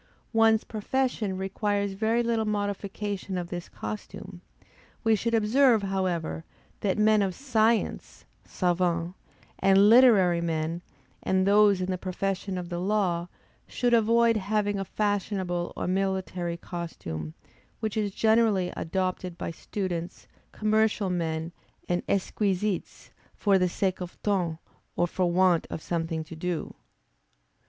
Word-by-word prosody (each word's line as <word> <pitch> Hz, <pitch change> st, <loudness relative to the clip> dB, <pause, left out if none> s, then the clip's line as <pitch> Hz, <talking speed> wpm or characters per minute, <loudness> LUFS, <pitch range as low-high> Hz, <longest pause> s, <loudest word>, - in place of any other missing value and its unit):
One's 225 Hz, -1 st, +4 dB
profession 220 Hz, -3 st, -1 dB
requires 200 Hz, +1 st, -1 dB
very 220 Hz, +4 st, +1 dB
little 230 Hz, -1 st, +1 dB
modification 205 Hz, -2 st, -3 dB
of 175 Hz, -1 st, -4 dB
this 175 Hz, -1 st, -6 dB
costume; 195 Hz, -3 st, -7 dB, 0.6 s
we 225 Hz, -1 st, +4 dB
should 230 Hz, +3 st, 0 dB
observe, 225 Hz, +1 st, +4 dB
however, 185 Hz, -4 st, -2 dB, 0.4 s
that 200 Hz, -1 st, 0 dB
men 215 Hz, 0 st, +4 dB
of 190 Hz, -3 st, -1 dB
science 230 Hz, -4 st, 0 dB, 0.2 s
(savans) 175 Hz, -1 st, 0 dB, 0.5 s
and 195 Hz, +2 st, +5 dB
literary 205 Hz, -9 st, +6 dB
men 165 Hz, 0 st, -2 dB, 0.4 s
and 190 Hz, 0 st, +1 dB
those 200 Hz, -1 st, +5 dB
in 185 Hz, +1 st, -1 dB
the 185 Hz, -, -2 dB
profession 190 Hz, +1 st, -3 dB
of 175 Hz, -1 st, -5 dB
the 175 Hz, -1 st, -3 dB
law, 180 Hz, -3 st, 0 dB, 0.4 s
should 245 Hz, -1 st, 0 dB
avoid 230 Hz, 0 st, +4 dB
having 205 Hz, 0 st, 0 dB
a 195 Hz, -, -3 dB
fashionable 190 Hz, -4 st, -1 dB
or -, -, -2 dB
military 185 Hz, -2 st, -1 dB
costume, 85 Hz, -, -6 dB, 0.4 s
which 215 Hz, -2 st, -3 dB
is 210 Hz, -2 st, 0 dB
generally 220 Hz, -3 st, +2 dB
adopted 185 Hz, 0 st, -2 dB
by -, -, -4 dB
students, 175 Hz, 0 st, -5 dB, 0.2 s
commercial 215 Hz, -2 st, +1 dB
men, 165 Hz, -1 st, -2 dB, 0.4 s
and 175 Hz, 0 st, 0 dB
exquisites, 200 Hz, 0 st, -1 dB, 0.2 s
for 200 Hz, -2 st, +3 dB
the 180 Hz, 0 st, +2 dB
sake 185 Hz, +1 st, -1 dB
of 180 Hz, -1 st, -7 dB
ton 180 Hz, -6 st, 0 dB, 0.4 s
or 175 Hz, -, +2 dB
for 175 Hz, 0 st, 0 dB
want 180 Hz, -1 st, +3 dB
of -, -, -4 dB
something 165 Hz, -1 st, -2 dB
to 160 Hz, +1 st, -10 dB
do. 175 Hz, 0 st, -3 dB
195 Hz, 130 wpm, -27 LUFS, 175-215 Hz, 0.6 s, literary